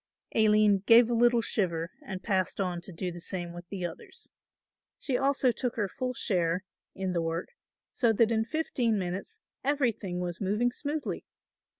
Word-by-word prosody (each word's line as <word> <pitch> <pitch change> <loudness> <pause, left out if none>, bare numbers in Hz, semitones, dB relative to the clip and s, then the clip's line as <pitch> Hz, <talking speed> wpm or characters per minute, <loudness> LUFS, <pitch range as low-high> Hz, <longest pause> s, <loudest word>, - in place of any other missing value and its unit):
Aline 215 -2 +5
gave 235 +1 +7
a - - +2
little 240 0 +4
shiver 170 -6 -1
and 190 -1 -6
passed 190 -3 0
on 180 -3 -1
to 190 - -8
do 180 +1 -3
the 175 0 -8
same 175 -1 -4
with 175 0 -10
the 190 -3 -3
others. 170 - -8 0.7
She 265 - -1
also 270 -1 +3
took 245 0 -2
her 210 -3 0
full 255 +6 -4
share 175 -3 0 0.3
in 190 -1 -2
the 170 - +1
work, 165 +1 -2 0.4
so 235 -4 +2
that 225 +1 +3
in 220 -1 +2
fifteen 240 -4 0
minutes 185 0 -4 0.2
everything 240 -10 0
was 175 0 -4
moving 210 +5 +1
smoothly. 295 +4 -3
205 Hz, 170 wpm, -29 LUFS, 180-240 Hz, 0.7 s, gave